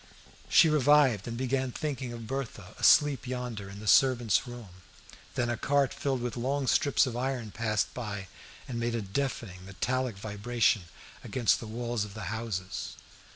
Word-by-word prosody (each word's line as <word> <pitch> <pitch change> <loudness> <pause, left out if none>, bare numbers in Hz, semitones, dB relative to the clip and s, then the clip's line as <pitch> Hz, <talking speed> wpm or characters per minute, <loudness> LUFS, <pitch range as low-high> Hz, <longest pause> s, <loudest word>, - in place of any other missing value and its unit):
She 165 - +7
revived, 145 -7 +4
and 115 0 -4
began 130 0 -1
thinking 135 -3 -4
of 115 -1 -7
Berthe 135 +1 -4 0.2
asleep 145 -5 +5
yonder 125 -6 -4
in 100 +1 -9
the 110 - -9
servant's 120 -1 +4
room. 110 -7 -10 0.5
Then 120 -2 +1
a 120 -1 -1
cart 140 -1 +2
filled 135 -3 -1
with 125 - -3
long 135 +3 -1
strips 140 +2 +3
of 125 -3 -4
iron 125 -3 -2
passed 110 -2 -1
by, 105 -5 -5 0.4
and 120 -2 -4
made 115 0 -1
a 115 - -2
deafening 100 -4 -3
metallic 125 +4 -2
vibration 105 0 0 0.4
against 125 -4 +2
the 115 - -8
walls 120 0 -2
of 105 -1 -9
the 105 -2 -4
houses. 110 -5 -4
120 Hz, 160 wpm, -29 LUFS, 105-130 Hz, 0.5 s, She